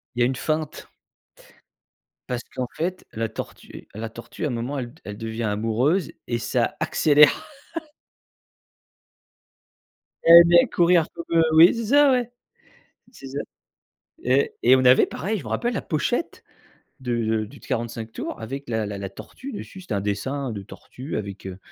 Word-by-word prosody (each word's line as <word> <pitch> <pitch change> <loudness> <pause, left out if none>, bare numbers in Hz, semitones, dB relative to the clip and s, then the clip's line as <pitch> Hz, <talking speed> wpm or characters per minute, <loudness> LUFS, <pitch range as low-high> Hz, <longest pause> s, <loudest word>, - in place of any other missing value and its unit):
Il 125 - -2
y - - +5
a - - +5
une 130 0 -1
feinte. 155 +2 -3 1.4
Parce 125 -1 -2
qu'en 125 - -2
fait 180 +3 -3
la 115 0 -2
tortue 110 - -9
la 110 +1 -5
tortue, 115 +7 -8
à - - +1
un - - -3
moment, 125 +4 -3
elle 120 -2 -5
elle 105 0 -7
devient 115 0 -4
amoureuse 115 - 0 0.2
et 120 -1 0
ça 115 - -1
accélère. 150 - +4 2.7
Ella 170 +1 +11 0.2
va - - -1
courir 170 -1 +4
comme, 170 - -7
heu, 165 - +6
oui, 165 +6 +8
c'est 230 -2 -3
ça, 285 +2 +5
ouais, 245 -2 0 0.8
c'est 135 - -12
ça 140 +2 -5 0.9
et 130 +3 +2
et 130 +2 +6
on 130 -1 +2
avait 125 +1 +6
pareil, 195 +9 -3
je - - -10
m'en - - -7
rappelle 240 0 -1
la - - -2
pochette 220 - -2 0.6
du 120 -3 -1
du 110 -1 0
du 140 - -15
45 115 -3 -4
tours - - -6
avec 135 +4 -6
la 110 -2 -1
la 100 -1 -5
la 100 -1 -4
tortue 270 - -10
dessus. 190 -2 -8
C'était 125 - -5
un 100 - 0
dessin 130 +6 -2
de 100 -2 -6
tortue 130 +8 -8
avec, 100 -2 -6
heu, 95 0 -7
130 Hz, 170 wpm, -24 LUFS, 110-160 Hz, 2.7 s, Ella